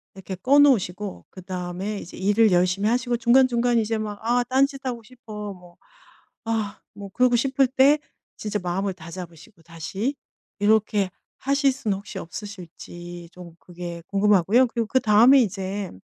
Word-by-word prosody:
이렇게 190 0 -7
꺼 255 +10 +3
놓으시고 210 -8 +2
그다음에 185 +2 -5
이제 175 - -10
일을 205 +3 +3
열심히 180 +3 +2
하시고 240 0 0
중간중간 240 0 +3
이제 225 0 -1
막 210 -1 -5
'아 240 +2 +1
딴짓하고 265 -2 0
싶어.' 215 -4 -8
뭐 180 -2 -17 0.7
아 220 -3 -3
뭐 200 -1 -9
그러고 250 +4 +2
싶을 270 +2 +2
때 275 +3 +4 0.4
진짜 210 -1 -3
마음을 190 +2 -2
다잡으시고 170 +2 -11
다시 180 - -4 0.4
이렇게 205 -2 +2 0.3
하실 275 +1 +2
수는 225 -6 -2
혹시 200 0 -9
없으실지 175 -2 -9
좀 175 -2 -12
그게 175 -1 -8
궁금하고요. 205 +4 +4
그리고 230 -1 -3
그다음에 235 +2 +5
이제 195 -2 -3
210 Hz, 325 characters per minute, -24 LUFS, 185-240 Hz, 0.7 s, 그다음에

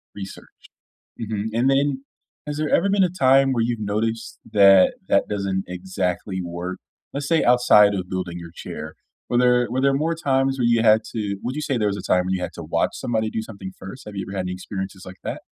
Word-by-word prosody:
Research, 95 -1 -8 0.8
mhm, 110 -2 -3
and 120 +3 +2
then, 135 0 +1 0.4
has 150 -1 -4
there 155 0 0
ever 195 - +3
been 200 0 +3
a 180 - +1
time 135 -5 +4
where 120 -3 +1
you've 115 -1 -1
noticed 110 +2 -2
that 100 -2 +6
that - - +3
doesn't 100 -2 -2
exactly 90 +1 -3
work? 85 +1 -5 0.3
Let's 140 0 -3
say 165 -1 +3
outside 120 -4 +5
of 90 -2 -4
building 90 -2 -4
your 85 -1 -9
chair, 75 0 -7 0.3
were 120 - 0
there 125 0 +3
were 130 +2 0
there 140 +1 +3
more 160 +4 0
times 135 -4 0
where 125 - 0
you 115 -1 +3
had 110 0 +5
to 105 -3 -2
would 125 +2 -3
you - - -2
say 140 -3 -1
there 105 -2 +1
was 100 - -2
a - - -6
time 90 -1 +2
when 95 - 0
you 95 - -2
had - - -4
to - - -7
watch - - 0
somebody 110 -2 -1
do 110 - -3
something 100 -4 -9
first? 95 +7 -10
Have 105 - -8
you 95 - -3
ever 95 - -6
had 95 - -1
any 90 - -3
experiences 95 +1 -6
like 95 0 -9
that? - - -4
110 Hz, 230 wpm, -23 LUFS, 95-130 Hz, 0.8 s, that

